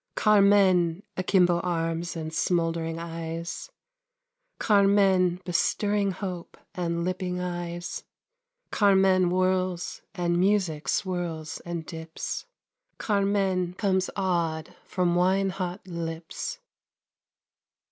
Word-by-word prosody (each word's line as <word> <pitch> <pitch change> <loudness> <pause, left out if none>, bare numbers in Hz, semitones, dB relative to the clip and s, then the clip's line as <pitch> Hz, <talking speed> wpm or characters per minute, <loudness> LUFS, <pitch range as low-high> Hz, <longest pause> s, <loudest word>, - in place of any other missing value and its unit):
Carmen! 195 -4 +4
Akimbo 180 -2 +3
arms 170 -1 -2
and 160 -1 -5
smouldering 165 -1 0
eyes; 165 0 -5 0.9
Carmen! 195 -3 +4
Bestirring 200 +3 +1
hope 185 -2 -6 0.2
and 170 -3 -2
lipping 180 0 -2
eyes; 175 -1 -4 0.7
Carmen 190 -2 +4
whirls, 185 -1 0
and 175 -1 0
music 180 -7 +1
swirls 170 -3 -2
and 170 -2 -4
dips. 160 - -6 0.5
"Carmen!," 195 -3 0
comes 190 -1 +1
awed 170 -5 -1
from 180 -2 0
wine 190 +2 +2
hot 185 0 -5
lips. 170 - -5
180 Hz, 85 wpm, -27 LUFS, 170-190 Hz, 0.9 s, Carmen